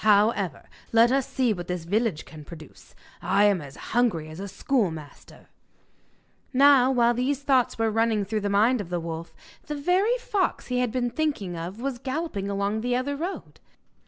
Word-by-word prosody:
However, 205 - +2 0.2
let 230 +1 +5
us 270 -1 +1
see 255 -4 +1
what 175 -3 -7
this 180 -2 -3
village 205 -2 0
can 155 -1 -11
produce. 155 -1 -13 0.3
I 200 - +2
am 200 -4 +3
as 140 -2 -10 0.2
hungry 215 -10 +1
as 155 +3 -9
a 200 - -5
schoolmaster.' 190 - -3 1.0
Now, 270 -1 +6
while 240 -2 +3
these 265 +3 -1
thoughts 265 -3 +2
were 225 -1 +1
running 225 -2 +1
through 215 +2 -2
the 205 - -1
mind 215 +4 +3
of 180 - -8
the 175 -1 -1
wolf, 165 0 -6 0.3
the 300 - -3
very 370 +11 +2
fox 420 -6 -1
he 250 0 0
had 250 -2 0
been 245 -1 -1
thinking 275 - -2
of 175 +6 -6
was 260 -1 -3
galloping 260 -7 -3
along 200 +2 -1
the 245 +1 0
other 270 +3 -1
road. 345 +7 -6
225 Hz, 180 wpm, -25 LUFS, 195-260 Hz, 1.0 s, Now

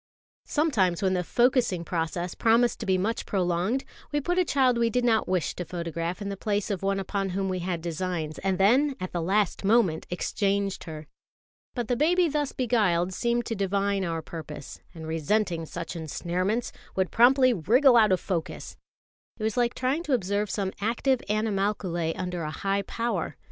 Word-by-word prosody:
Sometimes 210 - +1
when 190 -1 +2
the 180 -1 0
focussing 240 -5 +2
process 175 +1 -2
promised 235 +1 +3
to 220 - -5
be 190 -1 +3
much 215 +5 -2
prolonged, 185 +6 0 0.3
we 295 - +1
put 355 +5 0
a - - +5
child 260 -7 +2
we 230 -1 +3
did 245 +2 0
not 225 -2 +2
wish 185 -3 0
to 180 - -5
photograph 170 +2 -4
in 200 - -4
the 200 - -3
place 205 0 -1
of 195 - -2
one 195 0 0
upon 195 0 -2
whom 190 +1 -1
we 185 -1 -2
had 175 -2 -3
designs, 165 -2 -3
and 190 -1 0
then 260 +9 +4
at 185 0 -4
the 175 - -2
last 195 +3 +1
moment 200 -6 +2
exchanged 195 +2 -1
her. 155 -2 -7 0.7
But 240 -3 -2
the 245 - +1
baby 345 +6 +3
thus 295 -2 -1
beguiled 195 -8 +1
seemed 235 +4 0
to 225 - -3
divine 200 0 0
our 165 -2 -2
purpose; 155 -3 -8 0.2
and, 160 -1 -8
resenting 165 +2 0
such 170 +2 -6
ensnarements, 180 +8 -2 0.2
would 190 -1 0
promptly 255 +2 +5
wriggle 240 - +4
out 215 -4 +6
of 185 - +3
focus. 170 -5 -4 0.6
It 215 - -6
was 220 -1 0
like 240 -1 +1
trying 260 +5 0
to 290 - 0
observe 205 -2 0
some 195 -2 -2
active 240 +4 +1
animalculæ 195 -5 0
under 180 -1 -3
a 155 - -3
high 195 +5 -1
power. 230 +4 -3
195 Hz, 180 wpm, -27 LUFS, 175-235 Hz, 0.7 s, out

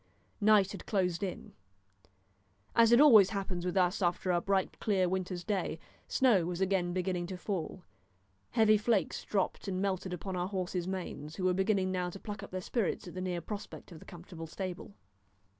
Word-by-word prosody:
Night 205 -2 +5
had 200 - -9
closed 180 -4 0
in. 195 -3 -5 1.2
As 230 0 +6
it 240 - +7
always 225 -10 +8
happens 195 -4 -3
with 180 - -1
us 180 +2 +2
after 180 +1 +1
a 175 -1 +2
bright 195 0 0
clear 190 -4 +1
winter's 180 -1 -3
day, 190 -5 -2 0.3
snow 235 -9 +3
was 175 0 -3
again 190 -2 +1
beginning 180 -1 -2
to 185 0 -6
fall, 180 -2 -4 0.7
heavy 215 -2 +4
flakes 210 -2 0
dropped 200 -1 -2
and 185 -1 -2
melted 190 -1 -1
upon 185 +2 -4
our 180 0 -1
horses' 185 -2 -3
manes, 175 -5 -5
who 190 - -5
were 185 0 +3
beginning 190 0 +1
now 180 -1 -1
to 195 - -9
pluck 205 0 -7
up 200 - -9
their 185 0 -4
spirits 205 -2 -2
at 175 - -8
the 185 - -5
near 180 -2 -2
prospect 200 +1 -8
of 165 - -10
the - - -14
comfortable 170 -1 -9
stable. 185 +3 -6
185 Hz, 185 wpm, -32 LUFS, 180-200 Hz, 1.2 s, always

